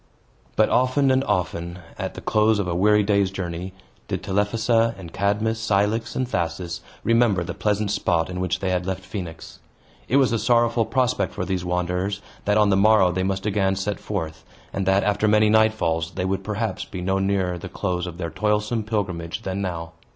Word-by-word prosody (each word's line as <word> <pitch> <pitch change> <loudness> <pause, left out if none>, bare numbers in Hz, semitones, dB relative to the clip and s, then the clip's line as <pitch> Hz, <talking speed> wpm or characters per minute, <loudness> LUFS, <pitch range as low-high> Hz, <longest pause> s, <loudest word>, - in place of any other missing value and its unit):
But - - +4
often 130 +2 +3
and 130 +1 +3
often, 85 -3 -2 0.2
at - - -4
the - - -7
close 110 0 +3
of 100 -3 -1
a 85 - -1
weary 105 +4 +4
day's 100 -1 +2
journey, 90 -1 -5 0.4
did - - -3
Telephassa 115 +3 +1
and 90 -4 -10
Cadmus, 105 +3 0
Cilix, 110 +1 0
and 130 -1 0
Thasus, 85 -4 -3 0.2
remember 115 -6 +3
the - - -5
pleasant 105 -1 0
spot 85 -4 +1
in 90 0 -5
which 90 -1 -1
they 95 - 0
had 90 0 -1
left 95 -1 -3
Phoenix. 90 -4 -7 0.5
It 130 - +1
was 135 -4 +4
a 115 - +1
sorrowful 120 -1 +3
prospect 125 -7 0
for 90 - -2
these 90 -1 -2
wanderers, 90 +2 -1 0.3
that 105 +1 +3
on 105 -1 +4
the - - +4
morrow 100 -2 +5
they 95 +1 -1
must 95 +1 -1
again 95 -2 +1
set 100 +1 -2
forth, 80 -6 -4 0.3
and 95 -1 -2
that, 95 +1 +4
after 105 +1 +1
many 105 0 +4
nightfalls, 110 -7 +2
they 90 - -1
would 95 +1 -1
perhaps 110 +2 -2
be 95 - -7
no 95 +2 0
nearer 95 -2 0
the 95 - -7
close 90 -2 -2
of 85 -1 -7
their 85 -3 -4
toilsome 105 +4 0
pilgrimage 100 -3 -3
than 95 0 -3
now. 85 -3 -4
100 Hz, 195 wpm, -23 LUFS, 90-110 Hz, 0.5 s, morrow